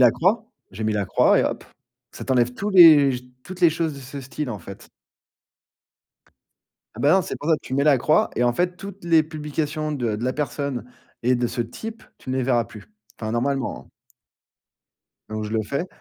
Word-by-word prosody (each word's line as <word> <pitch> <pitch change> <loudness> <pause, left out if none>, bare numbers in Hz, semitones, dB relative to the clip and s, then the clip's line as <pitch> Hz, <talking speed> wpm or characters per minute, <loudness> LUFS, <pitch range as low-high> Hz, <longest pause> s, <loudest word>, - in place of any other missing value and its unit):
la 125 -2 +7
croix, 210 - +1 0.2
j'ai 110 +3 -6
mis 110 - +1
la 105 -1 0
croix - - +4
et - - +2
hop, - - -3 0.5
ça - - -8
t'enlève 125 -2 +2
tous 205 +9 -3
les 155 -8 +8 0.3
toutes 185 0 -9
les 170 -2 +6
choses 160 -1 -2
de 140 - -10
ce 135 +2 -8
style, 135 +1 -5
en 105 - -5
fait. 100 +2 -12 2.0
Ah 110 - -12
bah 145 +6 +4
non, 190 - +4
c'est - - -5
pour 150 - -5
ça 160 - +5
tu - - -10
mets 140 +2 +2
la 145 -4 +5
croix 150 +5 +2
et 120 - 0
en 120 - +3
fait 180 +7 -1
toutes 195 -1 -10
les 165 -2 +5
publications 155 0 -3
de 120 -6 -1
de 115 - -4
la 130 - 0
personne 140 -3 -3 0.3
et 125 +2 +3
de 120 0 0
ce 120 - -4
type, 220 - -6 0.2
tu - - -8
ne 130 - -1
les 130 - 0
verras 120 -2 +2
plus. 110 -3 -13 0.3
Enfin 110 -1 -4
normalement, 130 +3 -2
heu - - -26 1.4
donc 110 0 -3
je 105 - -6
le 110 -1 0
fais. 140 - -3
140 Hz, 210 wpm, -23 LUFS, 120-160 Hz, 2.0 s, les